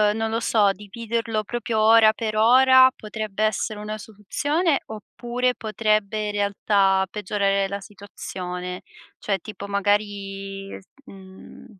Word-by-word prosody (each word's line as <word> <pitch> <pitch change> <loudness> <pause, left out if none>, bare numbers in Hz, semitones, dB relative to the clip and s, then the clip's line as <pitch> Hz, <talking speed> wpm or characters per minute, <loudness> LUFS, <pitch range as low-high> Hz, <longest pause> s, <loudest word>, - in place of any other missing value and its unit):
non 225 0 -1
lo 225 +1 -1
so, 210 -3 +3
dividerlo 225 +2 -3
proprio 230 0 -3
ora 220 0 +6
per 215 -1 -4
ora, 260 +3 +6
potrebbe 215 -1 -4
essere 215 0 -1
una 215 +1 -5
soluzione, 285 - -1
oppure 240 +3 -3
potrebbe, 215 -1 -1
in - - -2
realtà, 200 -1 +2
peggiorare 200 -1 0
la 200 +1 -4
situazione? 180 -3 -7 0.4
Cioè, 195 -2 -2
tipo, 200 +1 -9
magari, 200 -1 -2
s 190 - -23 0.2
mhmm, 190 -1 -14
210 Hz, 120 wpm, -23 LUFS, 195-225 Hz, 0.4 s, ora